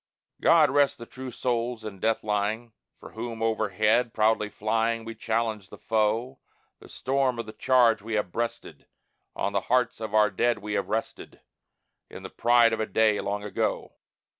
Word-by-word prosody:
God 160 -2 +5
rest 145 -1 +3
the 115 - -9
true 130 +2 -8
souls 120 -1 -2
in 100 -3 -7
death 110 +3 0
lying, 110 +2 -2 0.3
For - - -12
whom 115 0 -5
overhead 110 +2 +1
proudly 110 -1 +2
flying 115 +2 -1
We 115 - -6
challenged 110 -3 -2
the - - -11
foe. 115 +4 -1 0.4
The - - -15
storm 135 -1 0
of 115 - -4
the 110 - -9
charge 120 -5 +3
we 110 +1 -4
have 105 -4 -1
breasted, 115 +3 -5 0.5
On 100 - -2
the 100 - +1
hearts 125 -2 +2
of 110 -1 -4
our 105 -1 +4
dead 120 +4 +1
we 105 0 -6
have - - -2
rested, 110 +1 -4 0.7
In - - -10
the - - -8
pride 120 -1 +4
of - - -2
a 110 - -1
day, 105 +1 +2
long 105 0 -3
ago. 105 -2 -2
115 Hz, 175 wpm, -26 LUFS, 105-120 Hz, 0.7 s, God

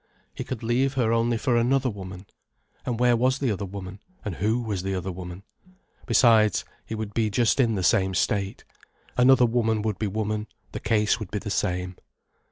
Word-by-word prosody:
He - - -5
could 125 -3 -6
leave 130 +4 +1
her 115 -3 +2
only 115 0 +2
for 120 +2 +1
another 125 +2 +2
woman. 95 -1 -9 0.6
And 120 -2 -1
where 125 -1 +4
was 130 +3 +2
the 135 -4 0
other 100 -1 -3
woman, 95 0 -8 0.3
and 100 -6 -4
who 110 +5 +1
was 105 -5 -2
the 95 +1 -2
other 95 +1 -3
woman? 90 +1 -8 0.6
Besides, 110 -5 +4 0.2
he 110 - -4
would 110 -1 -5
be 110 -2 +1
just 120 +5 +2
in 115 -4 +3
the 95 - -2
same 95 +2 +2
state. 100 +1 -1 0.5
Another 125 0 +6
woman 115 -2 +1
would 110 -4 -2
be 110 - 0
woman, 105 +1 -2 0.2
the - - -5
case 105 +1 +1
would 105 -5 -6
be 105 - -3
the 105 0 -5
same. 90 0 -1
110 Hz, 190 wpm, -25 LUFS, 95-120 Hz, 0.6 s, Another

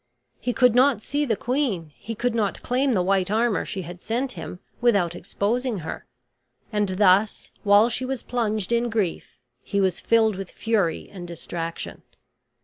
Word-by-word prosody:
He 250 - -1
could 250 -1 +4
not 255 -2 +4
see 290 +1 0
the 230 -5 +1
queen; 220 - -1
he 225 +1 -6
could 245 +2 0
not 215 -4 -1
claim 260 +2 +1
the 185 -4 +2
white 190 0 +2
armor 220 -3 +2
she 190 -2 -4
had 175 +2 -9
sent 250 +4 -1
him 180 - -7 0.2
without 200 -8 +3
exposing 210 +5 -1
her; - - -6 0.7
and 210 -2 +1
thus, 200 +1 +3
while 205 +2 +6
she 245 +2 -2
was 255 -1 -3
plunged 220 -4 -1
in 235 0 +2
grief, 210 -7 -2 0.2
he 200 - -2
was 190 -3 +1
filled 220 -3 +3
with 195 -1 -6
fury 205 -8 0
and 180 -3 -7
distraction. 165 0 -5
215 Hz, 165 wpm, -24 LUFS, 185-240 Hz, 0.7 s, while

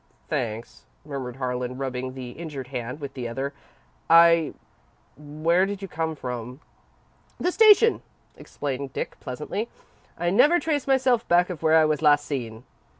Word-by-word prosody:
"Thanks," 115 -7 -4 0.2
murmured 135 -4 -6
Harlan, 125 -1 -3
rubbing 130 -1 -4
the 125 -2 -7
injured 140 -3 -7
hand 125 +1 -5
with 140 -2 -7
the 125 -3 -5
other. 135 +5 -4 0.6
"I 165 -1 +6 0.6
where 155 +5 0
did 200 -1 -5
you - - -4
come 160 -1 -3
from?" 125 -1 -6 0.8
"The 360 - 0
station," 445 +2 +6 0.3
explained 135 -1 -5
Dick, - - -5
pleasantly. 150 - -5 0.5
"I 175 +1 0
never 300 - +5
trace 295 -5 -1
myself 260 -3 +2
back 175 +1 +3
of 170 - -7
where 160 0 +4
I 160 - +5
was 155 -2 0
last 145 -1 +4
seen." 115 -5 -5
150 Hz, 150 wpm, -25 LUFS, 125-175 Hz, 0.8 s, I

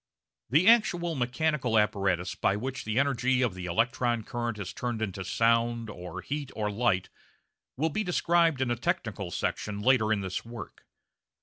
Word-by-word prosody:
The 155 - +4
actual 175 -7 +4
mechanical 130 -2 0
apparatus 95 -4 +1
by 100 - +1
which 130 +5 -4
the 110 +1 -2
energy 130 -2 +2
of 120 -6 0
the 90 -1 -6
electron 115 +4 +1
current 120 -1 -3
is 100 -3 -5
turned 120 -2 -3
into 95 -3 -3
sound, 115 +2 +1
or 90 -3 -7
heat, 145 -1 -4
or 105 -1 -1
light 100 -4 +1 0.7
will 160 +4 +1
be 215 - -1
described 170 -5 +2
in 125 -2 +1
a - - +2
technical 110 -4 -2
section 100 +4 -3
later 110 -1 +3
in 105 -2 +1
this 95 -1 -3
work. 115 0 -10
120 Hz, 165 wpm, -28 LUFS, 105-135 Hz, 0.7 s, The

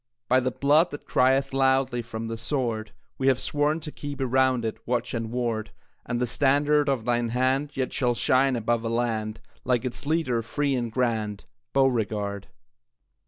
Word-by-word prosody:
By 130 +1 +4
the 130 0 0
blood 145 +7 +3
that 145 - -8
crieth 135 +1 +2
loudly 135 -2 +2
From 115 -1 -6
the 115 - -3
sword, 115 -2 -2 0.3
We 135 - +1
have 130 -2 +4
sworn 150 +3 0
to 155 0 -5
keep 145 -1 -7
around 130 -2 +2
it 110 - -3
Watch 125 0 -1
and 115 -2 -2
ward, 115 -2 -2 0.4
And 120 - -1
the 125 - +1
standard 145 +3 +2
of 130 -5 -1
thine 120 -1 +1
hand 130 +4 0
Yet 130 -1 -1
shall 125 -3 +1
shine 130 +2 +3
above 115 0 0
a 115 - -2
land, 115 -2 -1 0.2
Like 125 0 +1
its 125 +3 -4
leader, 150 -7 +1
free 140 +5 -1
and 120 -3 -1
grand, 110 -4 -1 0.3
Beauregard! 105 -7 0
125 Hz, 170 wpm, -26 LUFS, 115-135 Hz, 0.4 s, By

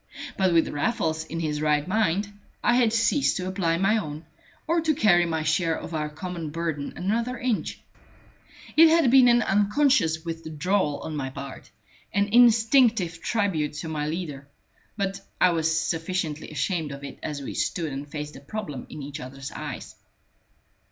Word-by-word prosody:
But 190 -2 +2
with 165 -1 +4
Raffles 160 -1 -1
in 165 +1 -5
his 150 -2 -2
right 150 0 +1
mind, 205 0 0 0.3
I 240 - +4
had 240 -2 +4
ceased 230 +5 +2
to 185 -1 -3
apply 180 -3 0
my 195 +5 +3
own, 155 -3 -6 0.4
or 335 +1 +1
to 315 -2 +1
carry 175 - +4
my 160 -1 -1
share 160 +1 +1
of 165 - -8
our 150 -1 -2
common 165 +1 -6
burden 160 -2 -3
another 230 +7 -1
inch. 245 -3 -2 1.0
It 325 +1 +8
had 320 -6 +4
been 260 -1 +7
an 240 -1 +5
unconscious 205 - +2
withdrawal 165 0 -1
on 155 - -5
my 135 -3 -3
part, 135 0 -9 0.5
an 200 0 +2
instinctive 225 -6 +4
tribute 195 -10 0
to 155 +2 -6
my 150 -1 -2
leader; 150 -4 -5 0.5
but 195 -1 -2 0.2
I 180 - +5
was 160 -1 +1
sufficiently 165 -2 -2
ashamed 155 +1 -2
of 140 0 -8
it 140 - -8
as 145 -2 -4
we - - -5
stood 160 -5 -2
and 140 +2 -5
faced 150 0 -6
the - - -10
problem 150 - -6
in 150 - -8
each 145 +2 -7
other's 135 +1 -8
eyes. - - -7
165 Hz, 165 wpm, -25 LUFS, 150-210 Hz, 1.0 s, It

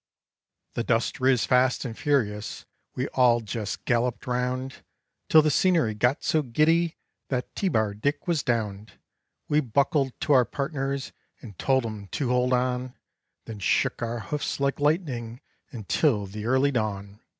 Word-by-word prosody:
The 120 - -2
dust 115 +2 0
riz 130 -2 +3
fast 125 +1 +2
and 115 -3 -5
furious; 110 -8 -1 0.3
we 130 +2 -1
all 125 -2 +4
jes 110 -1 -4
galloped 120 0 -1
round, 125 +1 -3 0.5
Till 155 -1 +7
the 155 - +2
scenery 165 - +2
got 125 +6 +1
so 155 - +2
giddy 160 +6 +2 0.3
that 125 -2 -3
T 195 - 0
Bar 110 - +1
Dick 140 - -2
was 165 -4 +1
downed. 110 -4 -2 0.5
We 150 - +3
buckled 140 +1 0
to 150 - +2
our 130 -2 +6
partners 140 0 -3 0.3
and 105 -6 -11
told 130 -2 +2
'em 105 -3 -6
to 135 -4 -1
hold 125 0 +2
on, 125 0 0 0.5
Then 110 -2 -8
shook 100 - +1
our 120 0 -3
hoofs 145 +9 -3
like 140 +1 0
lightning 140 -7 -1 0.3
until 110 - 0
the 105 +3 -6
early 130 +3 +3
dawn. 105 -4 -3
125 Hz, 150 wpm, -26 LUFS, 115-140 Hz, 0.5 s, Till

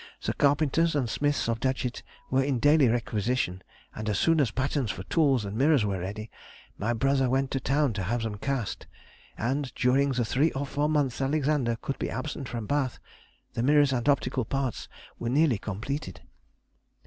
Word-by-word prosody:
The - - -1
carpenters 150 +3 +2
and 135 -4 +1
smiths 145 +4 0
of 115 -1 -1
Datchet 130 -1 -1 0.3
were 135 +1 +3
in 135 -2 0
daily 145 +2 +5
requisition, 115 -4 -1 0.3
and 110 0 -4
as 105 - 0
soon 165 +4 +3
as 130 - +2
patterns 130 +1 -1
for 100 -2 -4
tools 135 -4 +2
and 100 +1 -5
mirrors 135 -1 +3
were 100 -2 -1
ready, 105 +4 -6 0.4
my 110 +4 -1
brother 135 +2 +2
went 135 +1 +1
to 135 - 0
town 135 -1 +1
to 100 -2 -3
have 120 +4 -1
them 105 -2 -4
cast, 135 -3 -3 0.5
and 130 +4 -1
during 135 +2 +2
the 120 -2 0
three 135 +9 +2
or 140 +1 -2
four 145 +2 -1
months 145 -5 0
Alexander 140 -3 +1
could 135 -1 -3
be - - -2
absent 140 -1 -4
from 115 -3 -4
Bath, 135 0 0 0.6
the - - -2
mirrors 145 +1 +4
and 125 +2 0
optical 130 -2 +1
parts 135 +1 -3 0.3
were 120 - -2
nearly 140 -4 +3
completed. 110 - -5
130 Hz, 180 wpm, -27 LUFS, 115-145 Hz, 0.6 s, daily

